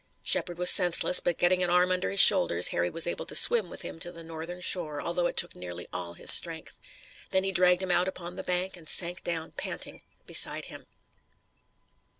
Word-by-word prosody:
Shepard 175 -2 -1
was 180 0 +6
senseless, 180 -1 +3
but 175 - -3
getting 180 +1 +1
an 180 - 0
arm 180 +1 +1
under 185 0 -2
his 195 - -1
shoulders 175 - +6
Harry 85 0 -2
was 165 - -2
able 175 - -5
to - - -6
swim 220 -7 +5
with - - -10
him - - -9
to 175 - -6
the 165 -1 -12
northern 165 +2 -9
shore, 165 -5 -2
although 175 +3 -3
it - - -8
took - - +1
nearly 90 -1 -9
all 85 -1 -7
his - - +5
strength. - - +1 0.5
Then 190 0 -1
he 195 - -3
dragged 180 0 +2
him 185 - -3
out 180 +1 +1
upon 180 -1 -8
the 190 - -6
bank, 180 +1 -3
and 165 -3 -11
sank 175 0 -2
down, 165 -2 -5
panting, - - -2 0.2
beside - - 0
him. - - -13
175 Hz, 205 wpm, -26 LUFS, 165-180 Hz, 0.5 s, was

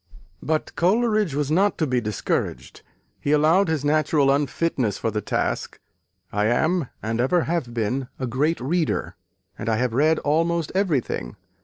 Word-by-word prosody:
But 155 +1 -2
Coleridge 215 - +2
was 145 0 -1
not 195 +5 +2
to 160 - +1
be 125 -3 0
discouraged. 105 -2 -3 0.4
He 145 - -1
allowed 160 +6 +4
his 155 -3 -1
natural 150 -2 +3
unfitness 140 - 0
for 115 - -2
the 105 0 -2
task - - -2 0.5
"I 105 +1 +1
am, 160 +6 +1 0.2
and 115 +2 -1
ever 170 +8 +2
have 160 -7 -2
been, 120 +3 -2
a 130 - -3
great 140 +7 0
reader, 155 +5 -1 0.4
and 115 - -3
have 115 +2 0
read 155 +5 +3
almost 165 +2 0
everything.... 160 - -1
150 Hz, 150 wpm, -23 LUFS, 125-165 Hz, 0.5 s, allowed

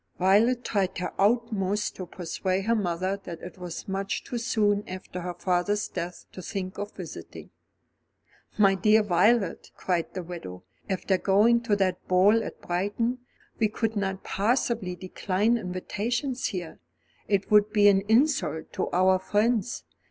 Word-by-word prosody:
Violet 220 +7 +3
tried 195 -3 0
her 180 - -3
utmost 210 -2 +1
to 185 - -6
persuade 185 +3 -2
her 230 - +3
mother 185 -2 -1
that 170 -2 -7
it 180 +1 -9
was 180 -2 -7
much 195 0 -2
too 240 - -4
soon 210 -4 +1
after 185 -1 -7
her 175 0 -5
father's 180 +4 0
death 175 +1 -6
to 185 - -9
think 185 0 -5
of 205 0 -4
visiting. - - -9 1.1
"My 200 -2 +5
dear 210 +3 +4
Violet," 200 +1 +2
cried 175 -3 -1
the 185 - -3
widow, 165 - -8 0.3
"after 190 0 0
going 220 +5 +4
to 225 -3 +1
that 185 -2 -1
ball 200 +5 +4
at - - -8
Brighton, 205 +8 -1 0.4
we 220 - +4
could 225 +1 -2
not 195 -2 -2
possibly 220 -3 0
decline 190 +4 0
invitations 235 +7 -2
here. 175 -4 -6 0.5
It 200 0 0
would 210 0 +5
be 205 -1 +5
an 195 -1 +5
insult 220 - +1
to - - -2
our 185 +1 +3
friends. 220 +4 0
195 Hz, 150 wpm, -27 LUFS, 185-220 Hz, 1.1 s, My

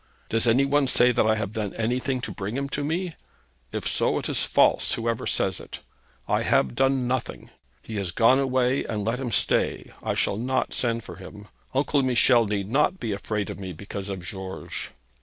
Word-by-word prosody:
'Does 115 +1 +1
any 125 +4 +4
one 140 0 +2
say 125 0 +4
that 110 - +2
I 110 - +4
have 105 -1 -3
done 105 -3 -3
anything 125 +3 -1
to - - -4
bring 105 +5 -4
him 140 0 -2
to 145 - -2
me? 170 +4 -2 0.6
If - - -3
so, - - +2
it - - -2
is - - +1
false, - - +3
whoever 115 0 -2
says - - +1
it. - - -9 0.5
I - - +2
have 65 - +2
done 135 - +2
nothing. 130 0 -3 0.3
He 110 - -6
has 100 -3 -2
gone 115 +9 +4
away, 130 -1 +1
and 105 -2 -3
let 115 +3 0
him 125 -3 -3
stay. - - +1
I - - -2
shall 100 - 0
not 130 +3 -1
send 115 -2 0
for 90 - -10
him. 105 +2 -11 0.3
Uncle 140 +1 +2
Michel 125 -2 +4
need 100 -1 -2
not 150 - +2
be 115 - -3
afraid 105 0 -2
of - - -8
me, 95 -2 -6
because 100 +3 -7
of 95 -2 -4
George.' 95 0 -5
115 Hz, 200 wpm, -25 LUFS, 105-130 Hz, 0.6 s, any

